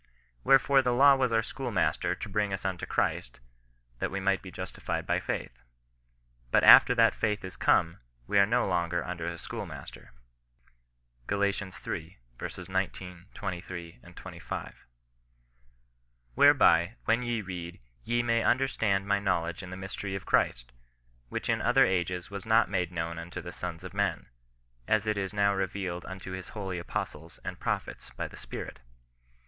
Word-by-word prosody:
Wherefore 135 0 +5
the 125 -2 +1
law 140 +2 +8
was 130 -3 +1
our 115 -1 +2
schoolmaster 120 -5 -1
to - - -6
bring 105 0 0
us 95 0 -4
unto 95 -2 -2
Christ, - - -1 0.6
that - - -1
we 100 - -3
might 95 0 +1
be 95 - -9
justified 90 - -4
by - - +1
faith. - - -5 0.9
But - - +3
after 125 - +9
that 115 -1 +5
faith 105 -2 -1
is 95 - -8
come, 85 0 +2 0.3
we 100 - +3
are 100 - +6
no 120 +1 +2
longer 85 -1 0
under 85 -2 -4
a 85 0 -4
schoolmaster." - - -8 1.2
Gal. 100 0 +1
iii. 95 -3 -3 0.5
19, 90 -1 -3
23, 85 -2 -6 0.2
25. - - -7 0.8
" - - -40
Whereby, 85 - +5
when 115 +2 +3
ye 120 -2 -1
read, 90 -2 -7 0.2
ye 120 0 0
may 115 -1 +2
understand 110 -7 +1
my 100 0 +2
know 100 -4 +1
ledge 85 +1 -5
in 90 - -9
the 90 - -7
mystery 95 +1 -5
of 95 - -6
Christ, - - +1 0.6
which - - -4
in - - +1
other - - +5
ages 90 0 -1
was 100 +1 -7
not 110 -2 +4
made 90 -3 0
known 85 -1 -3
unto 85 +1 -7
the 90 - -7
sons 85 -2 -6
of - - -8
men, - - -1 0.6
as 110 -1 +2
it 110 0 +1
is 95 -1 -2
now 100 -1 +2
re 95 -1 0
vealed 90 -2 -5
unto 95 0 -7
his 95 -1 -6
holy 95 -3 -3
apostles 85 -1 -5
and - - -5
prophets - - -3
by - - -2
the - - -13
Spirit." - - -7
95 Hz, 165 wpm, -29 LUFS, 85-105 Hz, 1.2 s, after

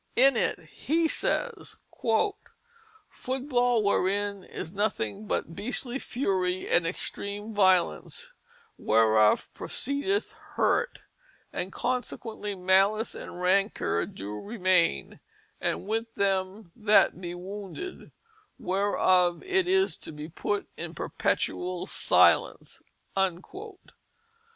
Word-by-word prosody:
In 270 +1 +6
it - - +1 0.3
he 325 +3 +3
says: 480 +8 0 0.2
"Foot 420 - -4
ball 245 -3 +3
wherein 200 0 0
is 165 - -7
nothynge 205 - -2
but 165 - -2
beastlye 250 +3 -2
furie 185 -7 -1
and 170 -1 +3
exstreme 205 +4 -4
violence, 190 - +2 0.5
whereof 110 -1 +4
proceedeth 285 - -1 0.2
hurte; - - +1 0.5
and 185 +2 -3
consequently 235 -4 -3
malice 195 +4 +3
and 175 - -8
rancour 185 - +1
do 105 +2 -7
remayne 185 - +1 0.4
with 225 +3 -1
them 195 0 -1
that 210 -4 +4
be 175 -1 -5
wounded; 200 - -7 0.5
whereof 185 -2 +2
it 380 -1 +1
is 380 +1 +2
to - - -8
be 150 0 -7
putt 205 +4 -2
in - - -6
perpetuall 180 0 -1
silence." - - +2
205 Hz, 95 wpm, -28 LUFS, 185-250 Hz, 0.5 s, In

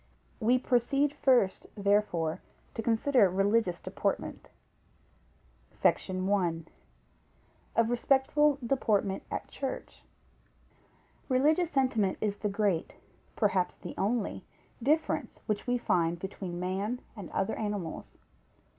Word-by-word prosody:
We 245 +2 +4
proceed 260 +3 +1
first, 250 -9 +2
therefore, 200 -5 +1 0.3
to - - -3
consider 230 -1 +3
religious 195 0 +1
deportment. - - -3 1.2
SECTION 185 0 0
I. 175 -5 +1 1.2
Of 230 0 +3
respectful 275 +4 +3
deportment 215 -6 +1
at - - -4
Church. 270 -2 -5 1.3
Religious 305 +7 +3
sentiment 250 - +1
is 205 -1 -1
the 210 - -1
great, 195 -4 0 0.4
perhaps 190 -4 +1
the - - -8
only 220 +1 -1 0.4
difference 305 +6 0
which 215 +1 -2
we 245 0 +2
find 170 -7 +1
between 180 -1 -6
man 195 +7 -2
and 200 -5 -8
other 195 +3 -1
animals. 205 -6 -4
210 Hz, 100 wpm, -30 LUFS, 190-250 Hz, 1.3 s, We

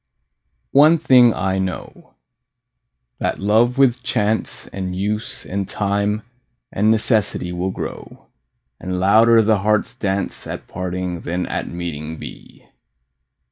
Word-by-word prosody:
One 155 +4 +6
thing 125 -5 +6
I 95 -1 -1
know, 95 -2 -6 1.0
that - - -1
love 110 +5 +2
with 130 -2 +3
chance 110 -4 -1
And 95 -2 -5
use 105 +4 -3
and 100 0 -3
time 100 +1 -1 0.5
and 105 +2 +1
necessity 110 -5 +1
Will 90 +2 -2
grow, - - -7 0.5
and 90 +1 -3
louder 110 +4 +5
the 110 -1 +3
heart's 105 +2 +1
dance 100 -5 -3
At - - -7
parting 90 -1 -4
than 90 +1 -2
at - - -3
meeting 80 -2 -5
be. - - -12
100 Hz, 120 wpm, -20 LUFS, 90-110 Hz, 1.0 s, One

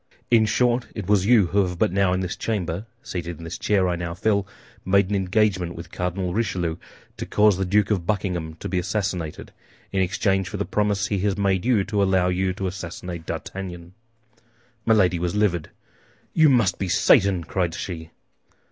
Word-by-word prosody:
In 110 -2 +5
short, 120 +2 +1
it 105 - -4
was 100 -2 +3
you 115 -5 +6
who 100 - +4
have 90 -2 -3
but - - +2
now 100 -1 +2
in 95 0 0
this 90 0 -3
chamber, 100 -2 -3 0.2
seated 85 -2 -5
in 85 - -11
this 85 0 -6
chair 100 -3 +2
I 90 - 0
now 85 0 -4
fill, 100 +1 +1 0.4
made 100 +1 +2
an - - +2
engagement 95 -2 +1
with 85 0 -9
Cardinal 90 0 -2
Richelieu 90 -7 -1 0.4
to - - -4
cause 105 -1 +4
the 95 - -1
Duke 105 +3 +2
of 90 -5 -1
Buckingham 90 -6 -2
to - - -6
be 90 0 0
assassinated, 90 -4 -3 0.4
in 95 - +1
exchange 95 +1 0
for 105 - -5
the 100 - -2
promise 105 -1 0
he 100 -1 -1
has 100 +1 0
made 95 -1 +1
you 120 -6 +3
to 105 0 -1
allow 95 -2 +3
you 95 +1 0
to 95 +1 -4
assassinate 90 -2 -6
D'Artagnan." 90 -2 -6 0.9
Milady 95 -6 +4
was 85 +1 -2
livid. 95 -6 +1 0.6
"You 160 -2 +5
must 115 -9 +2
be 95 - -2
Satan!" 95 0 +4
cried 85 -1 -1
she. 80 -3 -6
95 Hz, 185 wpm, -23 LUFS, 90-105 Hz, 0.9 s, you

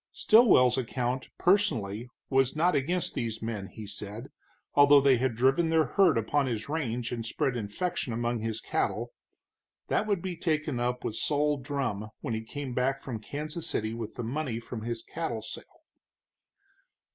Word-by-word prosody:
Stilwell's 190 - +5
account, 125 +1 -2
personally, 125 - +1 0.2
was 135 0 +2
not 175 +4 +3
against 170 +6 0
these 115 -1 -3
men, 110 -3 -4
he 110 +1 -9
said, 105 +4 -5 0.4
although 145 0 +7
they 135 -2 +5
had 125 -1 0
driven 135 +8 +3
their 160 -1 +4
herd 170 +1 +4
upon 135 +5 +1
his 115 -2 -3
range 125 -6 -2
and 120 -2 -3
spread 125 +3 -1
infection 120 - -2
among 120 +1 -1
his 110 0 -2
cattle. - - -1 0.8
That 215 - +1
would 200 -5 0
be 185 -2 -3
taken 155 -6 -1
up 125 +1 -1
with - - -2
Sol 145 +5 +1
Drumm 130 -7 -3
when 115 - -3
he 110 - -2
came 130 +3 -6
back 130 +2 +1
from 120 -5 -5
Kansas 155 +7 -5
City 110 +1 -1
with 115 -2 -6
the 120 - -4
money 125 -1 -2
from 115 -1 -7
his 115 0 -4
cattle 120 -10 -4
sale. - - -10
125 Hz, 165 wpm, -29 LUFS, 115-150 Hz, 0.8 s, although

